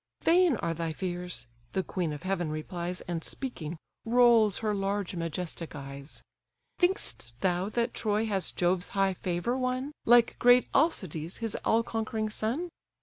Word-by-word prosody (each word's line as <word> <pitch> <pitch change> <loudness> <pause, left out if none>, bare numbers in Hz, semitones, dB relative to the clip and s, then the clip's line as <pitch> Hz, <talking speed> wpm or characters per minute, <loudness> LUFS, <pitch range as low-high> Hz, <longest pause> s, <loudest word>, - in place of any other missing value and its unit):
"Vain 345 -3 +5
are 170 -3 -1
thy 165 0 -2
fears 180 -7 -3 0.3
(the 190 - +1
queen 175 -3 -2
of 150 +2 -6
heaven 185 -3 -1
replies, 170 +3 -4
And, 170 -2 -4
speaking, 175 - -4 0.3
rolls 230 -3 +5
her 210 - +2
large 195 -1 -1
majestic 165 0 -4
eyes); 140 +1 -8 0.6
Think'st 125 - 0
thou 185 +1 +1
that 235 +2 0
Troy 215 0 0
has 195 -5 -1
Jove's 180 0 +1
high 195 -1 +3
favour 180 +6 -1
won, 255 +2 -1
Like 240 0 +5
great 245 +1 +6
Alcides, 185 - 0
his 225 -2 -2
all 230 +1 +3
conquering 220 -1 -2
son? 245 +12 -2
195 Hz, 145 wpm, -29 LUFS, 170-230 Hz, 0.6 s, great